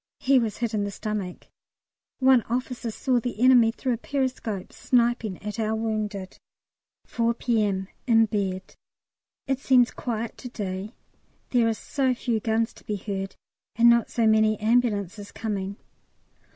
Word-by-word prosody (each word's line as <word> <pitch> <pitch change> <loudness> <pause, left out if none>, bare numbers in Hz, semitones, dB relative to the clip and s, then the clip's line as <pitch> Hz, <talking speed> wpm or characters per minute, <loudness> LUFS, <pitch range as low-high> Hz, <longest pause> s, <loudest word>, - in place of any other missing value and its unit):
He 270 0 +4
was 225 -4 -2
hit 235 -1 -2
in 210 -1 0
the 205 - -2
stomach. 200 -2 -5 0.7
One 260 -2 +5
officer 245 0 -2
saw 250 +3 0
the 235 -2 -5
enemy 245 -2 +6
through 250 +2 -2
a - - -2
periscope 250 -7 -3
sniping 235 -5 +1
at 210 +2 -5
our 220 0 0
wounded. 215 -4 -3 0.7
4 235 0 0
P.M. 210 -6 0 0.2
In 225 -2 +5
bed. 195 -3 -3 0.7
It 270 -1 -1
seems 255 -3 +4
quiet 230 -2 -4
to 250 - -7
day; 200 0 -5 0.6
there 240 -3 +3
are 225 - +1
so 260 +2 -1
few 235 -2 -1
guns 225 +1 0
to - - -17
be 210 - -3
heard, 195 -1 -4 0.4
and 235 +1 +7
not 235 -1 +2
so 230 - +1
many 220 0 +4
ambulances 210 -3 0
coming. 200 -3 -3
225 Hz, 150 wpm, -25 LUFS, 205-245 Hz, 0.7 s, and